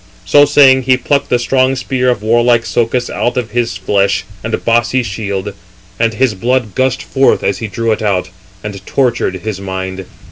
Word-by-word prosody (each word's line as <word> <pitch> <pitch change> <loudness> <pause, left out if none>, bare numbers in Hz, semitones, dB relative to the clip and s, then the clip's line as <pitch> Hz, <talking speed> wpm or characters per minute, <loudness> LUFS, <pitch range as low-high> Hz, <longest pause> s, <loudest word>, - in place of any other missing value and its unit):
So 145 +10 +5
saying, 140 -2 +5
he 130 0 +2
plucked 140 +2 -1
the 125 - +3
strong 130 +2 +1
spear 125 -1 -1
of 115 -4 -1
warlike 120 +1 +3
Socus 120 +1 0
out 120 +1 -2
of 115 -3 -2
his 120 -4 -1
flesh 100 -1 0 0.2
and 115 0 -3
bossy 120 +2 +2
shield; 100 -2 -4 0.5
and 115 -1 +1
his 130 -1 +1
blood 120 +1 -1
gushed 130 +2 0
forth 135 0 +1
as 100 - -1
he 115 - -4
drew 115 +2 -2
it 110 - -1
out, 95 -3 -1 0.3
and 100 -2 -7
tortured 125 -7 0
his 105 -3 -4
mind. 95 0 -5
115 Hz, 180 wpm, -14 LUFS, 100-125 Hz, 0.5 s, So